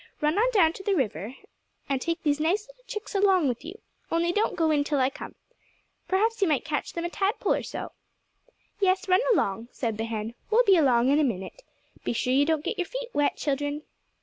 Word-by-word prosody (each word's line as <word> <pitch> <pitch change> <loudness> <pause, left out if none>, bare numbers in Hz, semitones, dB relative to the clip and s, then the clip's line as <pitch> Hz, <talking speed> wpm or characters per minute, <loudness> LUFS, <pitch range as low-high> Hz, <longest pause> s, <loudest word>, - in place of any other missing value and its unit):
Run 305 +5 +1
on 485 +3 +4
down 355 -9 +4
to - - -9
the 395 0 +1
river, 220 - -2 0.5
and 275 -2 -1
take 335 +2 -2
these 295 -1 +1
nice 380 +8 0
little - - -19
chicks 425 -1 -6
along 385 -5 +3
with 245 0 -2
you—only 340 -2 -3
don't 420 +4 0
go 325 -2 +2
in 290 -1 +2
till 290 0 -1
I 260 +1 +2
come. - - -9 0.7
Perhaps 440 +4 +1
you 390 - +4
might 295 -5 +1
catch 295 -1 -3
them 340 0 -3
a - - -1
tadpole 400 +5 +1
or - - -1
so." - - -6 0.9
"Yes, 385 +1 +2
run 370 +2 +4
along," 225 - 0
said 225 -4 -3
the 225 - -1
hen. 225 0 -4 0.2
"We'll 455 +3 +5
be 395 -4 +5
along 255 -6 +4
in 285 +2 +4
a - - +4
minute. 225 - -3 0.4
Be - - -1
sure 250 +2 0
you 280 +2 +4
don't 315 -2 0
get - - -3
your 355 - -1
feet - - -5
wet, 290 -5 +1
children." 290 +1 -2
320 Hz, 215 wpm, -27 LUFS, 270-390 Hz, 0.9 s, We'll